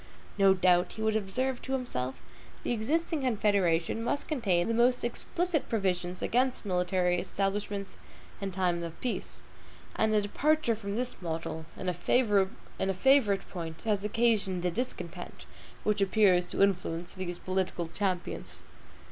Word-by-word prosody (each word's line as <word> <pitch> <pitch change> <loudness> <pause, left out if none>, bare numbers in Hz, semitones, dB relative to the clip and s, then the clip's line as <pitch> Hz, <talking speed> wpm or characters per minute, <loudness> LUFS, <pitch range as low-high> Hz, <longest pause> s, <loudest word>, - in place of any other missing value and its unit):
No 195 -1 +5
doubt, 180 -1 +3
he 220 - -5
would 220 0 +2
observe 245 +5 -1
to 265 - -4
himself, 130 - -2 0.5
the - - -1
existing 305 +8 0
Confederation 205 -5 +1
must 285 +4 -1
contain 200 - +1
the 230 - +1
most 245 +2 +3
explicit 335 +7 -1
provisions 185 -4 -1
against 250 0 +1
military 180 -1 +1
establishments 200 +1 -2 0.5
in 195 -1 -2
time 180 -2 0
of 170 -1 -6
peace; 250 - -3 0.5
and 220 - +2
a - - +5
departure 295 +5 +2
from 200 -2 -5
this 245 -3 -3
model, 160 -1 -4
in 185 - -5
a 180 - +1
favorite 200 +2 +2
point, 165 -3 -6
has 210 -3 0
occasioned 210 -4 +1
the 180 - +1
discontent 250 +8 -5 0.4
which 210 -1 +1
appears 190 -3 +4
to - - +2
influence 175 -3 0
these 180 -2 -4
political 185 -2 -1
champions. 180 +2 -3
200 Hz, 140 wpm, -30 LUFS, 180-230 Hz, 0.5 s, No